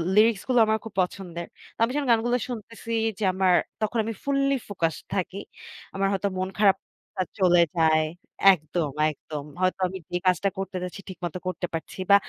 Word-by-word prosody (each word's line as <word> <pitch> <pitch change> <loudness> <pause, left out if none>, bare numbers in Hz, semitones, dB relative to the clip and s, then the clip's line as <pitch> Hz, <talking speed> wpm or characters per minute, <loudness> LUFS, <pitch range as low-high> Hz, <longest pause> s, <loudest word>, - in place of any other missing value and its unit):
লিরিক্সগুলো 230 +3 +4
আমার 220 0 +2
খুব 225 - -8
পছন্দের। 175 -2 -4 0.3
তো - - -48
আমি 230 - +2
যখন 290 -3 0
গানগুলো 235 +2 +3
শুনতেছি 230 0 -7 0.3
যে - - -2
আমার 185 -1 +3 0.3
তখন 215 +2 0
আমি 225 +1 -3
ফুল্লি 275 0 +2
ফোকাসড 165 -5 -1
থাকি। 190 0 -2 0.6
আমার 195 0 +1
হয়তো 195 +1 0
মন 185 0 -1
খারাপটা 195 -2 +3 0.5
চলে 175 -2 +6
যায়। 160 -1 +4 0.5
একদম, 155 -2 -2 0.2
একদম। 150 0 -6 0.2
হয়তো 185 +1 +1
আমি 190 +1 -6
যে 180 - +1
কাজটা 185 +2 +3
করতে 195 -1 -3
যাচ্ছি 180 +2 -6
ঠিকমতো 175 -1 -5
করতে 180 0 -2
পারছি 165 +3 -5
বা - - +10
190 Hz, 165 wpm, -26 LUFS, 175-220 Hz, 0.6 s, বা